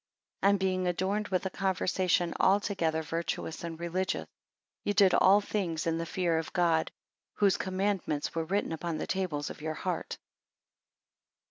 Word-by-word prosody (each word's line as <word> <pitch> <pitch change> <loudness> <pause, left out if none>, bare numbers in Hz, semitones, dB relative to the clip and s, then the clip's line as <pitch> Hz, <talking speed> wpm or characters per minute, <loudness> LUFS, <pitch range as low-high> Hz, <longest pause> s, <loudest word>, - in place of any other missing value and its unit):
And 200 +1 +4
being 185 -1 0
adorned 190 +4 0
with 185 0 -1
a 190 - -1
conversation 185 -2 +1
altogether 185 -5 +2
virtuous 165 +1 -3
and 165 -1 -5
religious, 170 - -1 0.6
ye 205 - 0
did 195 -2 +5
all 200 +2 +6
things 180 -6 -2
in 165 0 0
the 165 - -3
fear 170 -3 +1
of 160 - -5
God; 170 -3 +2 0.4
whose 200 -2 +3
I - - -4
commandments 190 -5 -1
were 165 -1 -1
written 195 +3 -1
upon 165 0 -3
the - - -3
tables 170 -7 -2
of - - -11
your 155 0 -3
heart. 180 -1 -3
180 Hz, 155 wpm, -30 LUFS, 165-190 Hz, 0.6 s, all